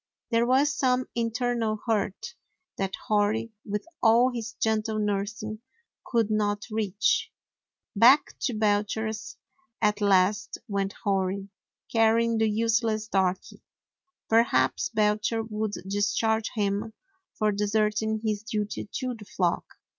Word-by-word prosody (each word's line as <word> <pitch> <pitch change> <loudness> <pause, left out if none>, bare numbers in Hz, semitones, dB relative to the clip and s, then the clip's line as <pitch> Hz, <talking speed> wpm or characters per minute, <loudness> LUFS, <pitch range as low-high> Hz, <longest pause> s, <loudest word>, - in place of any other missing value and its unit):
There 230 +1 +3
was 275 +3 +3
some 255 -2 +1
internal 230 -1 -1
hurt 220 - -1 0.5
that 195 0 -1
Hori, 215 +2 +1
with 210 0 -4 0.2
all 235 +3 +5
his 230 -1 -5
gentle 220 -1 0
nursing, 210 +1 -2 0.5
could 230 -3 +1
not 205 -1 0
reach. 210 -2 0 0.6
Back 250 +8 +6
to 245 - -1
Belcher's 215 +1 -1 0.4
at 210 -1 +1
last 200 +1 +2
went 200 -2 -1
Hori, 195 0 -1 0.4
carry 225 0 +4
ing 230 -1 0
the 220 -1 +3
useless 220 0 +1
Darky. 190 -2 -1 0.7
Perhaps 230 +10 +2
Belcher 215 - +1
would 215 -1 -3
discharge 215 +2 +1
him 205 +1 -1 0.4
for 215 -1 +2
deserting 210 +1 0
his 215 -2 -1
duty 215 -2 -4
to 255 -1 -2
the 220 -3 -11
flock. 180 -3 -1
215 Hz, 115 wpm, -27 LUFS, 205-225 Hz, 0.7 s, Back